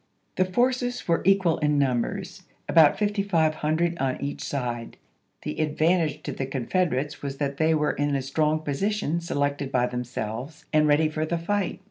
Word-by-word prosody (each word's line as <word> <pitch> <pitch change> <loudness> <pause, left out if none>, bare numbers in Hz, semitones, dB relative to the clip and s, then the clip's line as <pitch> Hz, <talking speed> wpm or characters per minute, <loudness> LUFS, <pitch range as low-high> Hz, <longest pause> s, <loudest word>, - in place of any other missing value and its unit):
The 185 - +2
forces 245 +5 0
were 170 -1 +2
equal 190 -4 +3
in 150 -1 +2
numbers, 130 -4 -1 0.3
about 160 -3 +6
5500 170 -5 +1
on 135 -1 -1
each 140 +1 -4
side; 120 -4 -4 0.5
the 75 - -3
advantage 155 0 +1
to - - -4
the 135 - -4
Confederates 140 +2 -1
was 140 -1 -5
that 140 -1 -2
they 160 +1 +3
were 150 -1 +1
in 145 0 -1
a 135 - -1
strong 155 +3 +1
position 170 +3 -1
selected 145 -3 -1
by 125 -2 +2
themselves 125 +3 -5
and 155 0 +4
ready 150 +2 +4
for 155 0 -2
the 170 +2 -1
fight. 195 +3 -1
155 Hz, 160 wpm, -25 LUFS, 140-170 Hz, 0.5 s, about